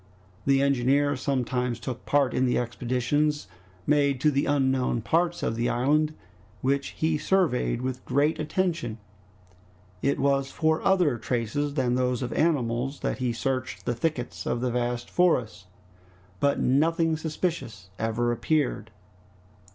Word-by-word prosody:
The 135 0 +4
engineer 140 +2 +2
sometimes 125 -2 -1
took 125 +1 -6
part 140 -2 +2
in 130 0 +2
the 125 - +1
expeditions 125 +4 0 0.4
made 140 -2 +2
to 150 - +4
the 140 0 0
unknown 130 -4 +1
parts 170 +5 +1
of 115 - 0
the 120 +1 0
island, 150 +5 +1 0.5
which 140 +1 +1
he 160 -1 +1
surveyed 145 -11 +1
with 130 0 -3
great 145 +4 +1
attention. 155 -7 -1 1.0
It 140 +1 +1
was 135 0 +1
for 160 +2 +1
other 175 -11 +2
traces 130 +6 -2
than 130 -4 +1
those 125 0 0
of 120 - -3
animals 135 -4 0
that - - -2
he 125 -2 0
searched 130 +2 -3
the 120 - 0
thickets 125 0 -3
of 120 - 0
the 125 0 -1
vast 120 0 -2
forest, 115 - +1 0.7
but 140 0 +2
nothing 160 +4 +2
suspicious 155 - -4
ever 115 +2 0
appeared. 125 -3 0
135 Hz, 135 wpm, -26 LUFS, 120-150 Hz, 1.0 s, The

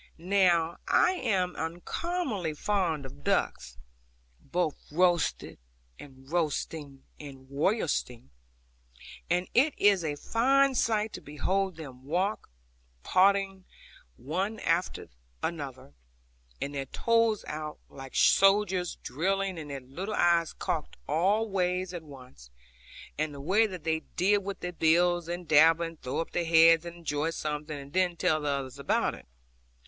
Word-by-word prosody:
Now 175 -2 +2
I 360 - +4
am 195 - -1
uncommonly 185 - -3
fond 170 -6 -1
of 70 - -12
ducks, 60 -2 -1 0.6
both 170 - -1 0.2
roasted 175 0 +1 0.4
and 135 -1 -14
roasting 150 -3 -3 0.2
and 135 -3 -10
roystering; 140 - -1 1.0
and 175 +1 +1
it 280 +4 +3
is 200 -3 +4
a 150 -2 -2
fine 270 - +2
sight 220 -3 0
to - - -7
behold 185 +6 -1
them 135 -5 -10
walk, 180 +9 -1 0.5
poddling 195 0 +2 0.5
one 190 - -3
after 170 +2 -1 0.4
other, 140 - -5 0.7
with 140 - -3
their 135 -1 -4
toes 230 - +1
out, 155 0 -5
like 135 -1 -11
soldiers 195 -2 +4
drilling, 190 +4 -1
and 150 -2 -8
their 140 -1 -5
little 180 +12 -5
eyes 170 -1 +3
cocked 155 -3 -4
all 195 +9 +2
ways 185 -2 -1
at 175 - -5
once, 130 - -14 0.7
and 155 -1 -1
the - - -8
way 195 +10 +3
that 185 -6 -8
they 160 0 0 0.2
dib 200 +3 +2
with 200 0 -6
their 180 0 -4
bills, 175 +1 +2
and 175 0 -5
dabble, 160 +2 +5
and 165 -1 -9
throw 130 +5 -2
up 165 - -6
their 175 - 0
heads 165 0 +6
and 170 0 -7
enjoy 160 -2 -2
something, 150 -1 -4
and 140 +1 -11
then 180 -1 +2
tell 155 -1 +1
the 150 - -1
others 135 -1 -3
about 140 - +1
it. - - -13
170 Hz, 140 wpm, -29 LUFS, 150-195 Hz, 1.0 s, heads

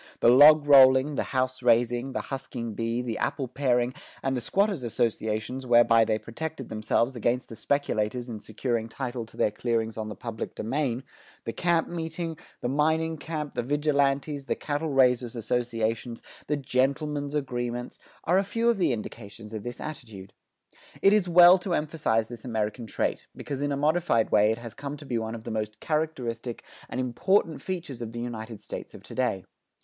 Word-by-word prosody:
The - - +5
log 145 +4 +8
rolling, 135 0 +7
the - - -1
house 130 -1 -1
raising, 120 +2 +2
the - - -1
husking 120 -4 -5
bee, 115 +3 -2
the 115 -2 -3
apple 140 -2 -1
paring, 125 -1 +1 0.3
and 135 0 0
the 125 - -2
squatters' 195 - +1
associations 115 +2 -2
whereby 120 -1 +6
they 110 0 +1
protected 135 +4 -6
themselves 115 +4 0
against 120 +2 -1
the 115 - -8
speculators 120 -2 -1
in 115 -3 -6
securing 115 +1 -3
title 120 -2 -4
to - - -18
their 105 - +2
clearings 115 0 -1
on 110 -1 -4
the 105 - -6
public 115 -3 -6
domain, 130 +1 -1 0.4
the 115 - -3
camp 170 -2 +1
meeting, 165 0 -4 0.3
the - - -1
mining 160 +4 +1
camp, 150 -3 -4
the 120 - -1
vigilantes, 140 +1 0
the - - -1
cattle 150 +2 -2
raisers' 125 -3 +3
associations, 115 0 -2 0.2
the 150 - 0
"gentlemen's 140 +2 -1
agreements," 120 -3 -3 0.2
are 180 +3 +3
a - - +1
few 230 +4 0
of 230 -4 +2
the 170 -8 +3
indications 110 -1 -8
of 110 - -4
this 120 +2 -7
attitude. 110 -11 -8 0.7
It 195 - +7
is 200 -4 +2
well 175 +2 +8
to 180 -1 -1
emphasize 150 -8 0
this 120 -2 -10
American 110 -1 -3
trait, - - -2
because 140 -1 -5
in 145 0 0
a 140 - 0
modified 150 -6 +2
way 105 +1 +5
it 110 - -1
has 115 -2 -8
come 145 +1 -6
to 145 - -11
be 120 -4 -1
one 110 0 -4
of 110 - -9
the - - -5
most 105 -1 -3
characteristic 130 -7 -2 0.3
and - - -4
important 160 - +1
features 170 -10 -5
of 115 -1 -5
the 120 - -5
United 115 -2 -6
States - - -8
of - - -12
to - - -10
day. 125 -7 -1
125 Hz, 180 wpm, -27 LUFS, 115-145 Hz, 0.7 s, log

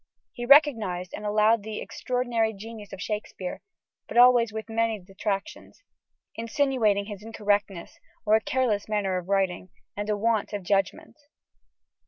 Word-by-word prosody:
He 240 -1 -6
recognised 225 - +4
and 210 - -5
allowed 215 +1 +3
the 215 0 -6
extraordinary 240 -3 -1
genius 215 0 -10
of 195 - -8
Shakespeare 210 -3 -5 0.5
but - - -5
always 240 -2 +6
with 220 0 -6
many 225 -1 0
detractions, 195 - -5 0.5
"insinuating 230 -4 +1
his 205 -2 -8
incorrectness, 205 -4 -2 0.3
or 210 - +3
a 220 - +5
careless 220 -5 0
manner 200 -3 0
of 180 +1 -12
writing, 190 -2 0 0.3
and 205 +1 -4
a 210 - +1
want 220 0 0
of 205 -2 -4
judgment." 200 - -1
215 Hz, 140 wpm, -26 LUFS, 200-230 Hz, 0.5 s, always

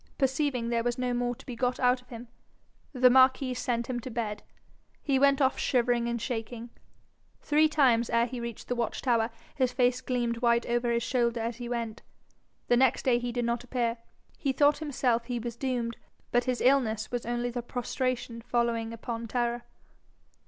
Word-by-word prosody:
Perceiving 265 -3 0
there 235 -1 +1
was 240 0 -1
no 250 -1 -1
more 245 0 -1
to - - -16
be 250 - -6
got 250 +1 -1
out 250 0 +3
of 250 - -27
him, 240 0 -9 0.6
the 255 -2 +5
marquis 260 0 +4
sent 240 -1 -1
him 245 0 -3
to 250 - -7
bed. 220 -3 -3 0.6
He 275 -3 +1
went 280 0 +4
off 265 -2 +2
shivering 240 -2 +1
and 235 0 -1
shaking. 235 0 -5 0.7
Three 310 +1 +3
times 250 -6 +3
ere 235 0 +3
he 250 0 -6
reached 235 -2 -6
the - - 0
watch 235 -2 -2
tower 230 -3 +2 0.2
his 260 -4 +1
face 250 0 +2
gleamed 240 -2 -1
white 235 -1 +3
over 240 0 0
his 235 0 +1
shoulder 235 -2 0
as 230 0 -3
he 240 -1 -6
went. 230 -2 -3 0.7
The 240 - +4
next 260 0 +3
day 245 -2 +4
he 245 0 -3
did 240 0 -1
not 235 0 -1
appear. 240 -1 -1 0.4
He 275 - 0
thought 290 +2 +4
himself 250 -6 0
he 245 0 -3
was 235 0 -5
doomed, 240 -2 -2 0.3
but 245 0 +2
his 255 -2 -1
illness 230 -5 +2
was 245 -1 -2
only 240 0 -1
the 245 0 -3
prostration 245 -1 -3
following 230 -1 -1
upon 230 0 -5
terror. 240 0 -1
240 Hz, 190 wpm, -29 LUFS, 235-255 Hz, 0.7 s, the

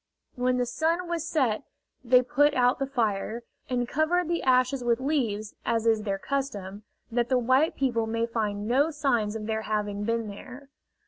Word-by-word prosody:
When 250 0 0
the 250 - +1
sun 335 +7 -1
was 340 -2 -2
set 250 -9 +1 0.4
they 250 +1 +5
put 290 +4 +3
out 250 0 +3
the 275 - -1
fire, 230 -3 -1 0.3
and 245 -1 0
covered 315 +5 +1
the 340 0 -1
ashes 255 0 +2
with 235 0 +2
leaves, 235 -7 -1
as 230 -1 0
is 225 -1 +3
their 200 -2 -2
custom, 205 -6 -4 0.3
that 240 0 0
the 255 - +3
white 260 +6 +2
people 235 -4 0
may 230 +1 0
find 210 -3 -2
no 275 +6 +3
signs 245 -9 0
of 215 -1 -4
their 220 0 -1
having 210 -1 -2
been 230 0 -1
there. 255 +7 -10
245 Hz, 180 wpm, -27 LUFS, 220-275 Hz, 0.4 s, they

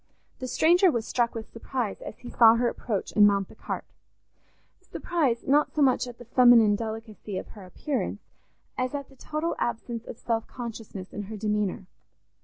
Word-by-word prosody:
The 255 - -4
stranger 345 +8 +4
was 235 -8 -1
struck 235 -1 0
with 225 -1 -7
surprise 230 -2 -3
as - - -8
he 245 - -10
saw 225 -1 +7
her 240 +1 +2
approach 215 -4 -3
and 205 -1 +8
mount 200 -2 +1
the - - -15
cart—surprise, 285 -10 -5
not 290 +3 +2
so 300 - +3
much 255 -1 +3
at 240 -1 -9
the 240 - -12
feminine 235 -3 +6
delicacy 220 -2 -6
of - - -6
her 205 -4 -12
appearance, 270 +9 -3 0.6
as 255 +2 -1
at 280 -1 -5
the 270 - -18
total 305 +5 -3
absence 235 0 -3
of - - -7
self 225 -1 -2
consciousness 225 -5 -8
in 205 - -5
her 215 +2 -7
demeanour. 210 -2 -1
235 Hz, 175 wpm, -27 LUFS, 215-255 Hz, 0.6 s, and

